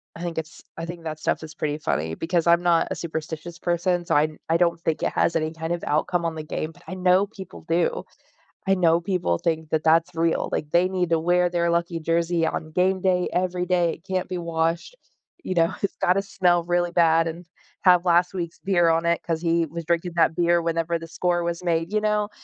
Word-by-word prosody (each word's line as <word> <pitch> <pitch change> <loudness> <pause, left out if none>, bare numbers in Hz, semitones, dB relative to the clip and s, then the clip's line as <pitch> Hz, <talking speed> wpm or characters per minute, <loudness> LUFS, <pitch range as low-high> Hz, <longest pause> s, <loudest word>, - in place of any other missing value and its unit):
I 165 - -9
think 170 -1 -4
it's 160 0 -6 0.2
I 165 - -4
think 170 0 -8
that 155 -1 -5
stuff - - -1
is 155 -1 -10
pretty 150 -1 -2
funny 80 - -2
because 170 - -1
I'm 170 0 +5
not 170 -2 +3
a - - -1
superstitious 160 0 -6
person 175 +1 0
so - - -1
I 145 - +5
n 155 0 -4
I 165 - +4
don't 170 -1 +1
think 160 -2 -1
it - - 0
has - - +1
any 155 0 -2
kind 160 0 -5
of 175 - -4
outcome 170 +3 0
on 165 -1 -2
the 155 - -5
game 155 +1 -4
but 175 - -21
I 185 - -5
know 185 +1 +3
people 195 -3 -11
do. 170 +1 +1 0.6
I 195 - +4
know 170 -2 +3
people 175 - 0
think 160 - -2
that 155 -1 0
that's 165 +2 +3
real. 165 0 0
Like, 150 - -2
they 175 +2 +4
need 180 -2 -1
to 165 -1 +2
wear 175 +2 +2
their 170 -1 0
lucky 170 0 -1
jersey 165 +1 0
on 155 0 -4
game 185 +3 +1
day 180 -1 +2
every 180 0 0
day. 175 -2 +2
It 165 - -13
can't 185 0 -1
be 185 - -3
washed. 165 - -2 0.5
You 185 - -3
know, 165 -1 +2
it's 200 - -1
gotta 185 +2 +2
smell 180 -3 +1
really 175 0 0
bad 165 -1 +3
and 170 +2 -6 0.4
have 180 -1 +5
last 175 +1 +3
week's 170 -2 -5
beer 175 -4 +2
on 165 +1 +1
it 170 0 +1
'cause 165 -1 -2
he 170 -1 +2
was 165 +2 -7
drinking 170 +1 -1
that 165 -1 +3
beer 170 0 +3
whenever 165 0 -1
the 165 - -9
score 175 +1 -1
was 170 +1 -3
made, 165 0 0
you 215 - +2
know? 210 -1 0
170 Hz, 235 wpm, -24 LUFS, 165-180 Hz, 0.6 s, I'm